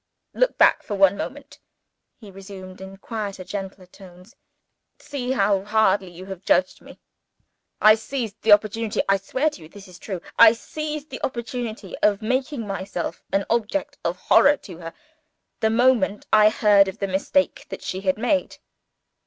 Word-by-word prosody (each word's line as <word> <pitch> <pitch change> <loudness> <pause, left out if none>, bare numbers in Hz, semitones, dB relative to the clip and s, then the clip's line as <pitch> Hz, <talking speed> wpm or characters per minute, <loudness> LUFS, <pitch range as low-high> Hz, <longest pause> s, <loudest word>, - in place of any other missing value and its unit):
"Look - - +1
back - - +5
for 205 - -5
one 195 0 +4
moment," 275 +6 -8 0.6
he 210 -4 -13
resumed, 190 -1 -11
in 190 0 -10
quieter 200 -3 -6
and - - -27
gentler 195 -2 -6
tones. 185 +4 -16 0.6
"See 260 -3 -5
how 200 -4 +1
hardly 210 -2 +1
you 175 +2 -11
have 190 -2 -8
judged 185 0 +1
me! - - -15 0.8
I 215 - +7
seized 225 -1 -5
the 220 - +2
opportunity 215 +1 +3
I 195 0 +3
swear 260 +10 -1
to 185 - -13
you 155 - -13
this 200 +2 -13
is 180 -1 -14
true 190 -4 -5 0.2
I 230 -1 +9
seized 305 +4 -6
the 260 - -7
opportunity 235 -5 -5
of 210 0 +1
making 255 +1 -2
myself 190 -3 -5
an 195 0 0
object 235 +5 -2
of - - -2
horror 290 +1 +4
to 180 -9 -12
her, 165 -1 -8 0.7
the 220 - +2
moment 225 -3 +2
I 215 0 +7
heard 205 -2 +4
of 190 - -6
the 200 - -2
mistake 195 +9 0
that - - -8
she 185 - -4
had 190 0 0
made. 260 +5 -1
205 Hz, 170 wpm, -23 LUFS, 190-235 Hz, 0.8 s, I